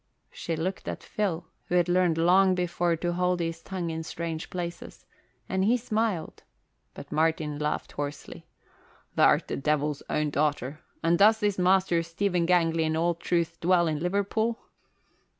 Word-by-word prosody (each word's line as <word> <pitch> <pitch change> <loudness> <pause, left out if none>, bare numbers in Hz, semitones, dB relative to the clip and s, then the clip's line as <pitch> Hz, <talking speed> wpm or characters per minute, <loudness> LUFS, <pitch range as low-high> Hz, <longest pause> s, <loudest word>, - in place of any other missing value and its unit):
She 165 - -4
looked 180 +4 -3
at - - -5
Phil, 180 -5 -2 0.2
who 180 - -2
had 175 -1 +3
learned 175 -2 +2
long 185 +3 +4
before 175 -1 0
to 175 +2 -2
hold 180 0 +1
his 165 -1 -3
tongue 180 -3 -4
in 160 0 -4
strange 160 0 -5
places, 175 -1 -6 0.4
and 190 0 0
he 230 +5 +3
smiled; 220 -6 -2 0.5
but 140 - -10
Martin 155 -1 0
laughed 150 0 -2
hoarsely. 145 0 -6 0.7
"Th' - - -5
art - - +5
the - - -3
Devil's 150 0 0
own 150 -1 0
daughter. 145 -1 -1 0.2
And 170 +1 +3
does 215 +2 +6
this 205 -3 0
Master 185 -2 +3
Stephen 170 +1 -1
Gangley 165 -2 +3
in 160 0 0
all 170 +1 +2
truth 170 0 -1
dwell 175 0 +3
in 155 -2 -1
Liverpool?" 200 +6 0
170 Hz, 160 wpm, -27 LUFS, 160-185 Hz, 0.7 s, does